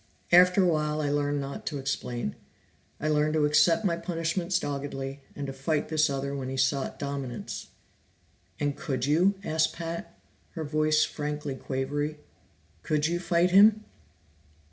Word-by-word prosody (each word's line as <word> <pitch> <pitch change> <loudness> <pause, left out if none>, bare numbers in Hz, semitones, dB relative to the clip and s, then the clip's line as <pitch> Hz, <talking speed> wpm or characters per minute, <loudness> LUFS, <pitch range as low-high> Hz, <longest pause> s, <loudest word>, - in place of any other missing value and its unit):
After 180 +2 +6
a - - +4
while 150 -2 0
I 145 -2 0
learned 145 0 0
not 140 0 -6
to 150 - -2
explain; 125 - -3 0.6
I 155 - -2
learned 155 0 +2
to 150 -1 +3
accept 165 +7 +4
my 170 -3 +2
punishments 170 +1 -1
doggedly, 140 -3 -4 0.2
and 145 - -4
to 135 - -5
fight 145 +3 -1
this 155 -1 +3
other 140 0 -2
when 130 -2 -4
he 135 - -4
sought 130 +1 0
dominance." 140 -4 -5 0.9
"And 145 -1 0
could 135 -6 -2
you?" 175 +7 +3
asked 160 -3 +1
Pat, 170 0 -6 0.4
her 160 - -4
voice 155 +1 +2
frankly 150 -1 -4
quavery. 145 +3 -3 0.6
"Could 150 -1 0
you 170 +2 0
fight 175 0 +2
him?" 210 +3 +6
150 Hz, 150 wpm, -28 LUFS, 140-165 Hz, 0.9 s, After